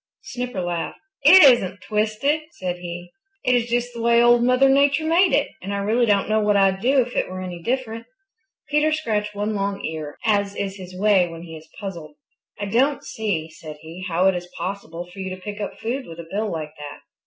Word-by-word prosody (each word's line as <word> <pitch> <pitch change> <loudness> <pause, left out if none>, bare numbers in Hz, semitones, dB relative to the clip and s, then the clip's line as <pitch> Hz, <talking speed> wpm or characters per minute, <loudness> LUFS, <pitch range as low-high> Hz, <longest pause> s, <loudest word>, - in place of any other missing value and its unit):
Snipper 245 -6 -4
laughed. 175 -1 -3 0.2
"It 360 +5 +9
isn't 200 -9 +4
twisted," 215 +8 0
said 180 -1 -4
he. 175 0 -8 0.3
"It 250 - +3
is 240 -1 +1
just 240 +1 -1
the 235 - -6
way 235 0 +4
Old 240 0 +5
Mother 255 +2 +4
Nature 285 +3 +3
made 345 +3 +4
it, - - +2
and 195 - -5
I - - -1
really 220 +4 +1
don't 200 -2 +2
know 215 +1 +2
what 210 -1 +2
I'd 195 -1 +3
do 265 +2 +4
if 245 0 -5
it - - 0
were 185 0 -6
any 180 -2 -6
different." 230 +1 -3 0.6
Peter 300 +2 +2
scratched 210 -9 -1
one 205 +2 -2
long 200 -1 -2
ear, 155 -2 -5
as 200 -2 +1
is 195 0 -4
his 185 -1 -10
way 200 -3 +4
when 165 0 -9
he 165 -2 -9
is 155 0 -13
puzzled. 170 -7 -7 0.4
"I 205 - -2
don't 260 +8 +1
see," 175 -8 -3
said 155 -1 -10
he, 165 +3 -9
"how 175 +1 +1
it 190 - +5
is 175 0 -5
possible 175 -2 -5
for 180 +2 -14
you 190 0 -4
to - - -15
pick 205 +1 -6
up 205 - -5
food 250 +4 -4
with 165 0 -10
a 165 - -8
bill 210 +1 -1
like 155 -2 -5
that." 145 -1 -8
205 Hz, 220 wpm, -22 LUFS, 180-240 Hz, 0.6 s, It